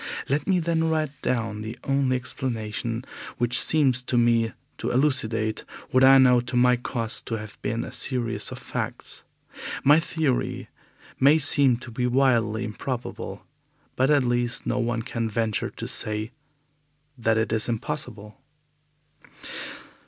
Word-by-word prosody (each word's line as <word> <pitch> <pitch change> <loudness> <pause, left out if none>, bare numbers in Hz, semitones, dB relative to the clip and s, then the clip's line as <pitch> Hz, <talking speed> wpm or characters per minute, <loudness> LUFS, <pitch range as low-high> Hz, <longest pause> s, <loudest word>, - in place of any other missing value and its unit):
Let 140 +3 -1
me 190 -2 +3
then 165 -1 0
write 155 -3 0
down 115 -4 -2
the 110 +3 -7
only 135 -2 +1
explanation 115 -2 -4 0.3
which 120 0 +4
seems 135 -5 +4
to 125 0 -2
me 115 -1 +3 0.3
to - - -2
elucidate 115 -5 0 0.3
what 130 0 +4
I 135 +1 +8
know 125 -2 +5
to 120 +1 -6
my 125 0 +4
cost 120 -2 -3
to 115 - -2
have 105 -1 -10
been 115 +2 -2
a - - -8
series 120 -4 -2
of - - -6
facts. - - -6 0.6
My 145 +3 +6
theory 155 -6 -2 0.5
may 145 +4 +6
seem 140 -4 +6
to 125 0 -11
be 125 +1 -1
wildly 120 -4 +2
improbable, 120 +3 -6 0.5
but 130 +2 +2
at 145 -3 +4
least 120 -1 0
no - - -1
one 115 -1 -1
can 115 -2 -3
venture 110 0 -1
to - - -7
say 110 +1 -1 0.8
that 115 -3 +1
it 110 0 0
is 110 +1 +2
impossible. 120 -2 -4
120 Hz, 145 wpm, -25 LUFS, 115-135 Hz, 0.8 s, I